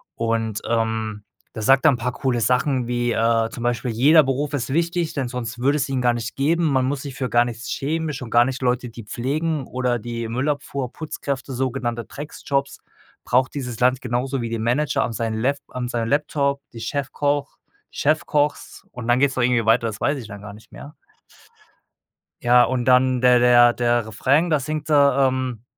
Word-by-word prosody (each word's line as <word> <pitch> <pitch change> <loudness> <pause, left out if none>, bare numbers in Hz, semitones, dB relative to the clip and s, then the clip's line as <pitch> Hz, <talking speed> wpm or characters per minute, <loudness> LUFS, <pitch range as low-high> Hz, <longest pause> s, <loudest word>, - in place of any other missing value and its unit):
Und, 115 -2 -1
ähm, 110 -2 -1 0.3
der 110 - -5
sagt 135 +6 +4
dann 140 -6 +5
paar 125 +2 -2
coole 125 -3 -1
Sachen 125 +2 +1
wie, 120 0 0
äh, 115 0 +2
zum 120 - -8
Beispiel: 120 0 -1
„Jeder 145 +8 +5
Beruf 135 +2 -2
ist 130 -3 -2
wichtig, 170 0 0
denn 135 -4 -2
sonst 120 -2 -5
würde 140 +4 +2
es 140 -1 -1
ihn 130 -2 -1
gar 120 -1 +3
nicht 115 -1 -5
geben. 165 +5 +1
Man 130 -4 +2
muss 135 0 -2
sich 140 -2 -7
für 130 -2 -3
gar 120 +1 +4
nichts 115 -1 -6
schämen, 160 +2 -2
schon 130 -4 -7
gar 120 0 +6
nicht 130 +1 -4
Leute, 125 0 0
die 115 0 -10
pflegen 145 +7 -2
oder 125 -1 -1
die 115 0 -5
Müllabfuhr, 140 0 -2
Putzkräfte, 140 -3 -5
sogenannte 125 -2 -2
Dreckjobs, 140 -1 -4 0.5
braucht 130 +1 +2
dieses 125 -5 -5
Land 125 +1 +2
genauso 125 +2 -2
wie 115 - -3
den 115 -1 -3
Manager 140 +6 +1
an 115 - -3
sein 115 -1 -2
Lap 130 +6 0
an 125 -1 -4
seinem 115 -2 -2
Laptop, 140 -1 0
die 115 - -9
Chefkoch 140 +3 -2 0.3
Chefkochs“ 150 -1 -1
und 125 -3 -7
dann 120 +1 +3
geht's 140 -1 +2
da 130 - 0
irgendwie 120 -2 +2
weiter, 115 +1 +3
das 110 0 -6
weiß 145 0 +1
ich 115 - -9
dann 100 -1 -9
gar 105 -1 -9
nicht 105 +2 -17
mehr. 145 - -11 1.5
Ja, 120 0 +5
und 125 -1 -1
dann 130 0 +3
der 125 0 +5
der 120 0 +6
der 120 -2 0
Refrain, 140 +9 +1
da 150 -3 +2
singt 155 +3 -4
er, 140 -2 +4
ähm, 130 -3 -3
125 Hz, 195 wpm, -22 LUFS, 120-140 Hz, 1.5 s, gar